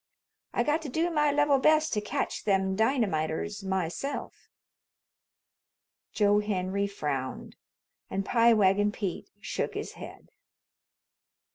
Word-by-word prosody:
I - - +1
got 300 +2 +1
to 305 - -6
do 330 +6 0
my 300 -2 +2
level 290 -1 +3
best 310 +2 +3
to 210 - 0
catch 210 - -3
them 190 -2 +1
dynamiters 205 - 0
myself." 190 - -4 1.6
Joe 205 -1 +3
Henry 200 -1 -1
frowned, 140 -9 -4 0.5
and 195 0 -2
Pie 235 +1 +4
Wagon 205 0 +3
Pete 205 - -4
shook - - -3
his - - -4
head. - - -11
205 Hz, 115 wpm, -28 LUFS, 190-275 Hz, 1.6 s, Pie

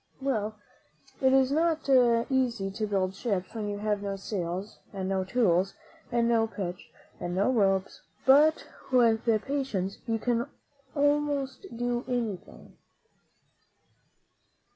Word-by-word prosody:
Well, 220 -6 -1 0.7
it 265 -1 +4
is 265 0 +4
not 320 0 +1
easy 240 -4 +2
to 215 +2 -3
build 190 -2 0
ships 195 -3 -3
when 215 -2 -3
you 205 - -3
have 210 -1 -1
no 200 -1 -3
sails, 190 0 -4
and 190 -2 -4
no 190 -1 0
tools, 190 -3 +1 0.4
and 235 -1 +2
no 225 -1 +3
pitch, 185 -5 -6 0.3
and 175 0 -3
no 200 +7 +2
ropes; 195 -5 +1 0.2
but 295 +4 +5 0.3
with 230 -3 +4 0.2
patience 260 -9 -2
you 225 -1 +1
can 235 +1 0
do 240 - -3 0.5
almost 290 +1 0
anything. 240 -3 -4
225 Hz, 120 wpm, -28 LUFS, 195-260 Hz, 0.7 s, but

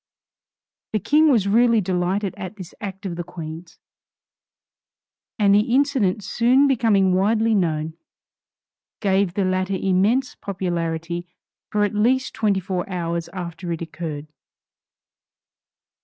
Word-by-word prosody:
The 215 - +2
King 305 - +4
was 225 -8 +3
really 230 +2 +4
delighted 185 +1 -1
at 195 0 -7
this 185 -4 -10
act 195 0 -6
of 175 -3 -4
the 175 - -3
Queen's, 165 -1 -9 1.6
and 200 -3 +4
the 210 +4 +3
incident 260 -9 +1
soon 250 +7 +3
becoming 220 -8 +3
widely 220 +4 +2
known, 160 -5 0 1.1
gave 195 -3 +1
the 200 - +1
latter 185 +1 0
immense 205 +8 +2
popularity 175 -2 -3 0.4
for 210 -1 +1
at 205 - 0
least 250 +5 +1
twenty 210 -3 +1
four 185 0 -3
hours 170 -2 -3
after 175 -1 -6
it 165 - -3
occurred. 160 -3 -6
195 Hz, 120 wpm, -22 LUFS, 175-215 Hz, 1.6 s, King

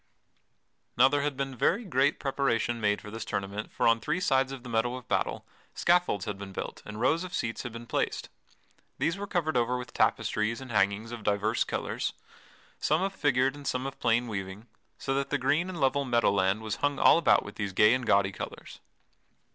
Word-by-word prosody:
Now 125 +2 +7
there 145 +1 +1
had 140 -2 -2
been 135 -1 -3
very 230 - +1
great 145 -6 +2
preparation 120 -4 0
made 105 -1 +1
for 105 - -9
this 110 0 -5
tournament 100 0 -4
for - - +1
on 115 0 +4
three 155 +9 -1
sides 135 -6 +2
of 135 -3 -7
the 125 - -8
meadow 115 +2 0
of 130 -2 -9
battle - - -1 0.3
scaffolds 175 -11 +2
had 105 -3 -4
been 100 -1 -7
built - - -6
and 105 0 -7
rows 160 +8 +2
of 185 - -5
seats 115 -1 -2
had 120 - -6
been 115 +1 -8
placed. - - -2 0.7
These 165 - 0
were 200 +1 -5
covered 160 -6 -1
over 125 +1 +1
with 125 -1 -8
tapestries 110 +2 +1
and 130 -2 -9
hangings 100 +2 +1
of 120 -1 -6
divers 105 +2 +1
colors - - -3 0.7
some 155 +5 +1
of 195 0 -1
figured 135 -5 +2
and 145 -1 -8
some 130 +1 -1
of 135 0 -6
plain 120 +1 +2
weaving 100 0 -5 0.3
so 135 - -2
that 140 0 -1
the 145 - +1
green 145 +7 +1
and 180 -3 -6
level 140 +1 +2
meadow 120 -5 +2
land 100 +2 +1
was 110 -1 -3
hung 145 -1 0
all - - +6
about 170 - +4
with - - -10
these 100 -2 -2
gay 105 +4 +5
and 130 -2 -1
gaudy 100 -1 +3
colors. - - -8
125 Hz, 210 wpm, -29 LUFS, 110-140 Hz, 0.7 s, Now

